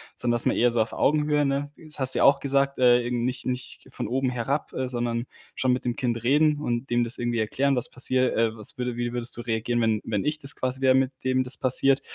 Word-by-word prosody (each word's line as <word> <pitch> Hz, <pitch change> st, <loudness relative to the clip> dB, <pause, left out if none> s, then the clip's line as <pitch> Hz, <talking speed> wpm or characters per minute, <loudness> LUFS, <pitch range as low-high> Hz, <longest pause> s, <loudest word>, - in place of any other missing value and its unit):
Sondern 120 Hz, 0 st, -1 dB
dass 120 Hz, -, +4 dB
man -, -, +2 dB
eher 120 Hz, -, +3 dB
so 115 Hz, -, +2 dB
auf 110 Hz, -, -11 dB
Augenhöhe, 150 Hz, 0 st, +2 dB
ne? 140 Hz, +1 st, -2 dB
Das 155 Hz, -3 st, -5 dB
hast 130 Hz, 0 st, +4 dB
ja -, -, +2 dB
auch 140 Hz, 0 st, +5 dB
gesagt, 140 Hz, 0 st, +1 dB
äh, 120 Hz, -1 st, +4 dB
nicht 125 Hz, +1 st, -2 dB
nicht 125 Hz, -1 st, -5 dB
von -, -, -5 dB
oben 130 Hz, +3 st, 0 dB
herab, 130 Hz, +4 st, -3 dB
äh, 130 Hz, -1 st, -2 dB
sondern 120 Hz, -1 st, -2 dB, 0.3 s
schon 130 Hz, -1 st, +1 dB
mit 125 Hz, 0 st, -3 dB
dem 120 Hz, -, -1 dB
Kind 120 Hz, -2 st, -2 dB
reden 150 Hz, +3 st, +3 dB
und 120 Hz, 0 st, -3 dB
dem 120 Hz, 0 st, +2 dB
das 115 Hz, +1 st, +1 dB
irgendwie 120 Hz, -1 st, -1 dB
erklären, 135 Hz, +6 st, 0 dB
was 125 Hz, 0 st, -2 dB
passiert, 130 Hz, 0 st, 0 dB
äh: 115 Hz, -1 st, +1 dB
„Was 110 Hz, -2 st, -5 dB
würde 125 Hz, -1 st, -2 dB
wie 120 Hz, 0 st, -3 dB
würdest 120 Hz, -1 st, -3 dB
du -, -, -5 dB
reagieren, 120 Hz, 0 st, -1 dB
wenn 110 Hz, -2 st, +1 dB
wenn 105 Hz, -3 st, -1 dB
ich 150 Hz, +1 st, -1 dB
das 140 Hz, -1 st, 0 dB
quasi 130 Hz, 0 st, -2 dB
wäre, 130 Hz, -1 st, +4 dB
mit 130 Hz, 0 st, +2 dB
dem 130 Hz, 0 st, +1 dB
das 125 Hz, +1 st, -3 dB
passiert?“ 135 Hz, +1 st, +2 dB
125 Hz, 245 wpm, -25 LUFS, 120-135 Hz, 0.3 s, auch